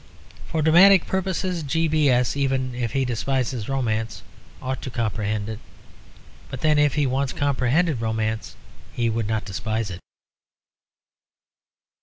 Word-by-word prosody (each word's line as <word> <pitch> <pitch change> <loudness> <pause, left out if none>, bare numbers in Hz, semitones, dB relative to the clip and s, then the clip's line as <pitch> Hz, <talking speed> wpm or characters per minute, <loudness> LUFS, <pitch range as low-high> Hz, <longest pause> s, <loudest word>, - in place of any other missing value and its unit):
For 160 -2 -1
dramatic 175 +4 +7
purposes, 185 -2 -2
G. 160 +3 0
B. 155 -2 +3
S., 125 0 +2
even 135 -2 0
if 120 -3 -3
he 135 -1 +1
despises 125 -1 -2
romance, 115 -5 -2 0.4
ought 130 0 -4
to - - -5
comprehend 105 -3 -2
it. 110 -1 -6 0.9
But 130 - -7
then, 155 -1 +3
if 145 0 +2
once 135 -1 0
he - - -15
comprehended 140 +1 +1
romance, 110 -1 -2 0.4
he 115 -1 0
would 110 -1 -2
not 110 -1 -1
despise 110 +1 -3
it. 90 - -7
130 Hz, 135 wpm, -23 LUFS, 110-150 Hz, 0.9 s, dramatic